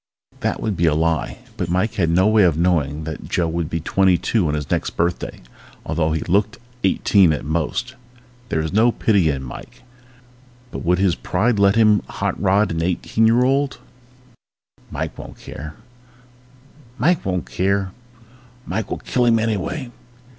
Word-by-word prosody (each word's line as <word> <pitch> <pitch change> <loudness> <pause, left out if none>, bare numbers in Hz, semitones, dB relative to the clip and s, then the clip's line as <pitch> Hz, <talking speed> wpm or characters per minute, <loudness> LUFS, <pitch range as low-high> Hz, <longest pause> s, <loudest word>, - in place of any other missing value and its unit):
_ - - -26
That - - -1
would 105 -3 -2
be 85 0 +2
a 75 - +3
lie 80 0 0 0.2
but 90 -5 -3
Mike 95 +5 0
had 85 -5 0
no 90 +3 +3
way 110 0 +4
of 85 -5 +3
knowing 80 -4 +1
that 80 -1 -7
Joe 85 - +1
would 80 -1 -2
be 80 - -2
twenty 95 +2 +2
two 105 -3 0
on 75 - 0
his 75 -2 -5
next - - -1
birthday, 85 +1 -2 0.4
although 80 0 0
he 80 - -1
looked 100 +5 0 0.3
eighteen 95 -1 +4
at 75 - -3
most. 85 - -2 0.6
There 80 - 0
was 80 +2 -4
no 115 +4 +4
pity 100 -8 +2
in 70 -2 -2
Mike 65 - -10 0.9
but - - -5
would 90 +1 +2
his 95 -1 +2
pride 105 +6 0
let 100 0 +4
him 110 -2 +4
hot - - -3
rod 100 +1 +2
an 80 0 -2
eighteen 90 +6 +1
year 120 +2 +4
old? 135 +2 +1 1.1
_Mike - - -4
won't - - -10
care! 75 +2 -9 1.2
Mike 175 +1 +2
will 90 -2 -1
kill 115 - -3
him 115 -1 +4
anyway! 115 +4 -2
95 Hz, 160 wpm, -21 LUFS, 80-110 Hz, 1.2 s, way